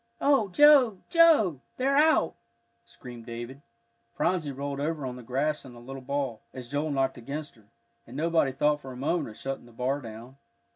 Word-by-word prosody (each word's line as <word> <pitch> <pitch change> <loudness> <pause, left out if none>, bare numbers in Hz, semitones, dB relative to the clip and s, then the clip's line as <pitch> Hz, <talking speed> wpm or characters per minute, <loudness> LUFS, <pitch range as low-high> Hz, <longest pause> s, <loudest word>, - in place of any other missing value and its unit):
"Oh, 275 -7 +3
Joe, 270 -2 +6
Joe! 295 - +5 0.2
they're 270 +2 +1
out!" 300 - +4 0.5
screamed 120 0 -12
David. 120 +4 -7 0.5
Phronsie 170 -6 0
rolled 140 +1 -5
over 150 -1 -2
on 125 -1 -5
the 125 - -9
grass 140 +6 -1
in 125 -2 -12
a - - -12
little 135 +3 -9
ball, 135 -3 -3
as 125 -1 -8
Joel 145 +2 -1
knocked 135 -3 -1
against 145 +5 -6
her, 110 -3 -24 0.4
and 125 +4 -9
nobody 160 -3 +2
thought 150 +2 +1
for 135 - -9
a 125 - -9
moment 150 +2 -1
of 110 - -13
shutting 135 -2 -5
the - - -16
bar 130 +5 -2
down. 115 +3 -10
140 Hz, 185 wpm, -27 LUFS, 125-165 Hz, 0.5 s, Joe